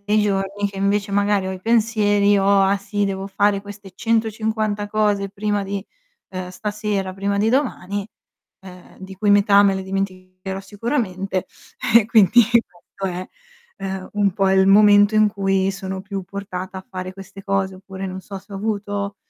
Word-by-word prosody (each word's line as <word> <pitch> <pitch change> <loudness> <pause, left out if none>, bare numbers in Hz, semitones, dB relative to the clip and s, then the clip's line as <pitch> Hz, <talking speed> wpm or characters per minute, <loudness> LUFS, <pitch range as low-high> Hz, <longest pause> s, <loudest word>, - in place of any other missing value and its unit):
nei 210 +1 +3
giorni 200 0 -1
che 200 - -11
invece 200 +1 0
magari 200 -1 +1
ho - - -3
i 185 - -8
pensieri, 210 -2 +3
ho: 195 0 +4
"Ah 195 +1 +3
sì, 205 +1 -2
devo 195 0 -3
fare 200 0 +1
queste 200 -1 -11
150 220 -1 -1
cose 205 -2 +1
prima 205 0 -1
di, 195 0 -4 0.5
uhm, 185 -1 -5
stasera, 205 0 -3
prima 200 +1 -1
di 210 +2 +2
domani, 205 -7 -1 0.6
uhm, 180 -1 -14
di 190 0 -9
cui 205 +2 +1
metà 200 0 +6
me 200 -1 +3
le 190 - -3
dimenticherò 190 0 -5
sicuramente", 195 -3 -3 0.5
eh, 225 -3 +5
quindi 225 +1 +6 0.2
questo 180 +2 -8
è, 185 +1 -5 0.5
ehm, 190 -1 -5
un 205 -2 +2
po' 195 +1 +1
il 190 0 +4
momento 205 +1 +6
in 215 0 +5
cui 195 -1 0
sono 190 -1 -5
più 195 0 -5
portata 190 -1 -6
a 190 - -13
fare 185 0 -6
queste 195 0 -11
cose. 195 -1 -1
Oppure 190 0 -7
non 185 0 -6
so, 195 +1 -8
se 200 - -17
ho - - -5
avuto 205 -1 -3
200 Hz, 170 wpm, -21 LUFS, 190-205 Hz, 0.6 s, metà